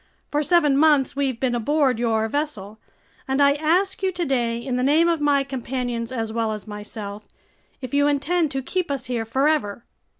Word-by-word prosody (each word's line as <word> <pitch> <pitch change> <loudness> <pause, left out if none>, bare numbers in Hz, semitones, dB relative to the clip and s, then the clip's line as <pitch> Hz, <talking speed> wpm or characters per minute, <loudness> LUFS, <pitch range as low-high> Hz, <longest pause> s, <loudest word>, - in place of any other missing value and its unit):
For 295 - +1
seven 300 -3 +3
months 295 -4 +3
we've 270 -4 -1
been 255 -2 0
aboard 260 +1 +1
your 225 -2 +1
vessel, 220 -7 -4 0.5
and 265 +1 0
I 280 0 +5
ask 345 +7 0
you 380 -1 +1
today, 265 -10 -1
in 245 +2 -3
the 250 - 0
name 300 +6 +4
of 335 -3 +1
my 285 -1 +3
companions 250 -3 -4
as 225 -3 -3
well 225 -1 -1
as 210 - -7
myself, 210 0 -7 0.5
if 255 -1 -7
you 285 0 +3
intend 310 +3 +1
to 270 -1 -4
keep 365 +3 -2
us 275 -3 -3
here 240 -3 -2
forever." 260 -3 0
270 Hz, 180 wpm, -23 LUFS, 230-295 Hz, 0.5 s, I